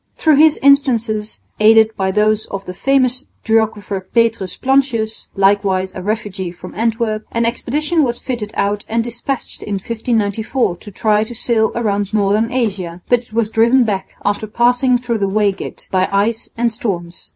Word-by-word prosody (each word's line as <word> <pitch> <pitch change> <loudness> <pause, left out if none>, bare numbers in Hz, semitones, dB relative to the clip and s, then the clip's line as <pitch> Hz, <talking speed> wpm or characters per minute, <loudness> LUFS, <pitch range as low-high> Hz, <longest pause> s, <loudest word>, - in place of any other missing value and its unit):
Through 310 -3 +3
his 310 +1 +5
instances, 235 -6 +2 0.2
aided 220 0 +5
by 190 -1 -1
those 215 +2 +1
of 195 0 -6
the 180 - -6
famous 255 +4 +1 0.2
geographer 220 -3 0
Petrus 225 -1 0
Plancius 255 -5 0
(likewise 195 -1 +2
a 185 - -6
refugee 205 -2 -3
from 180 +1 -11
Antwerp), 225 -1 -1
an 230 0 0
expedition 300 +7 0
was 240 -3 -1
fitted 235 -5 -4
out 200 +1 0
and 230 +1 +1
despatched 240 +3 -5
in 205 - -3
1594 220 -1 -1
to 205 - -11
try 210 +1 +1
to 235 +2 -8
sail 220 -2 +1
round 205 -2 -1
northern 210 +3 +1
Asia, 190 -8 -2
but 245 - +4
it 235 -2 -20
was 225 -1 0
driven 235 +4 +4
back 200 -4 -3
after 205 +1 -1
passing 245 +3 +2
through 240 -2 -2
the 195 -1 0
Waigat 200 -1 -2
by 185 0 +1
ice 215 +3 0
and 235 -1 +1
storms. 180 -6 -5
220 Hz, 160 wpm, -17 LUFS, 200-240 Hz, 0.2 s, his